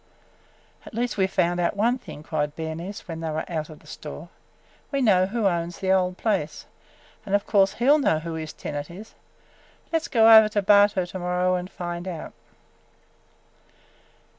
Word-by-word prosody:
"At - - -12
least 240 0 -1
we 190 -1 +3
've - - -18
found 175 -1 +1
out 175 - 0
one 240 +5 +2
thing!" 150 - -11
cried 150 -2 -2
Bernice 165 +6 -6
when 165 -2 -6
they 165 -1 -3
were 155 +1 -3
out 155 -3 -4
of 155 - -12
the - - -22
store. - - -9 0.6
"We 275 - 0
know 190 -7 +4
who 225 +1 -2
owns 170 -2 0
the 190 -1 -1
old 185 -1 +1
place, 195 -9 -2 0.6
and 200 -2 0
of 200 - 0
course 195 -2 +3
he 240 - -2
'll 295 +2 +6
know 215 - +2
who 165 +1 -5
his 160 -1 -5
tenant 145 0 -6
is. 200 +6 -11 0.8
Let 325 - +2
's - - -7
go 225 -1 +7
over 220 -1 +8
to 205 -1 -1
Bartow 200 -2 +4
to 185 +1 -7
morrow 180 +1 0
and 180 0 -2
find 175 -1 -6
out!" 170 -4 -6
185 Hz, 190 wpm, -24 LUFS, 165-210 Hz, 0.8 s, over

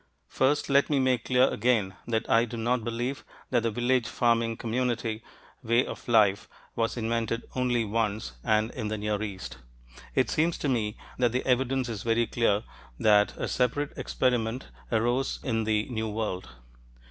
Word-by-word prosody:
First, 140 - +1
let 140 0 +3
me 145 -2 +2
make 130 -2 +1
clear 130 +1 +4
again 110 -6 +1
that 115 -1 -1
I 115 +1 +4
do 120 0 -7
not 120 +1 0
believe 120 +4 -3 0.3
that 120 -2 +3
the 115 - 0
village 120 +1 +1
farming 115 -1 +1
community 115 -1 -1 0.4
way 120 +1 +2
of - - -8
life 105 -4 +3 0.3
was 115 +1 -1
invented 115 0 -1
only 125 -3 +1
once 105 - -1
and 110 +1 +2
in 110 -4 -4
the 110 0 -2
Near 105 0 -2
East. 95 - -6 0.6
It 130 - +2
seems 165 0 +1
to - - -2
me 110 -4 -1 0.2
that 120 -2 +2
the 125 - -1
evidence 130 0 +1
is 110 -4 -4
very 115 +1 +2
clear 110 -2 +1 0.4
that 105 -1 +4
a - - -2
separate 135 +4 0
experiment 120 - -1 0.2
arose 120 +4 +1
in 115 -5 0
the 105 -1 +1
New 110 -2 -2
World. 105 -4 -3
115 Hz, 165 wpm, -28 LUFS, 110-125 Hz, 0.6 s, clear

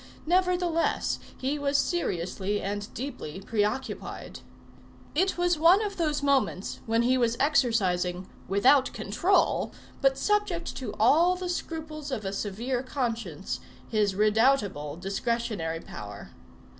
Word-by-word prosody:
Nevertheless, 355 -1 +1 0.2
he 275 +3 -2
was 280 0 +1
seriously 200 - -1
and 205 +1 -4
deeply 230 - -5
preoccupied. 210 +5 -3 0.7
It 375 +5 +1
was 350 -2 +2
one 355 +6 +6
of 400 - -5
those 300 -4 0
moments 270 -9 +1
when 230 +1 +2
he 255 +2 +3
was 235 -1 +1
exercising 190 - +1 0.2
without 255 +8 +4
control, 220 - +1 0.3
but 270 -1 +3
subject 375 0 0
to 235 -6 -5
all 330 +11 +5
the 360 0 -4
scruples 315 -4 -4
of 235 -7 -3
a 195 - -2
severe 230 +6 -2
conscience, 230 - -3 0.3
his 210 -3 +1
redoubtable 210 - +2
discretionary 195 -3 -2
power. 105 -1 -9
245 Hz, 120 wpm, -28 LUFS, 200-310 Hz, 0.7 s, one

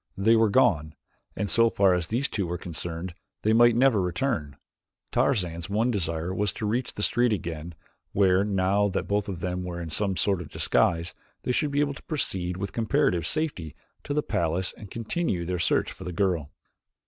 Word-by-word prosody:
They 110 +4 +4
were 110 -1 +4
gone, 80 - +2 0.4
and 105 - -2
so 115 +3 +4
far 100 -4 +3
as 90 -2 -1
these 125 +7 0
two 100 -4 -2
were 90 +1 -3
concerned 85 +1 -5 0.3
they 110 - +3
might 120 0 +6
never 120 -4 +4
return. 85 - -2 0.5
Tarzan's 85 -10 0
one 110 +5 +1
desire 85 -3 -2
was 105 +1 0
to 110 - -4
reach 120 +4 -1
the 105 - -3
street 120 +2 +3
again, 85 -4 -4 0.4
where, 95 -1 +3
now 100 0 +2
that 95 - -2
both 100 0 0
of 90 -3 -5
them 90 +1 -2
were 90 -1 -5
in 85 -2 -6
some 95 +2 0
sort 95 -3 +1
of 80 - -9
disguise, 85 0 +1 0.3
they - - 0
should 145 +4 +1
be 145 +1 +1
able 145 -1 0
to - - -11
proceed 90 - -2
with 100 0 -4
comparative 115 - +1
safety 140 - -2 0.3
to 145 - -3
the 150 - +1
palace 85 +3 -1
and 105 - -11
continue 115 - -2
their 90 0 -2
search 85 - +1
for - - -9
the 90 - -5
girl. 85 -6 0
95 Hz, 195 wpm, -26 LUFS, 85-115 Hz, 0.5 s, might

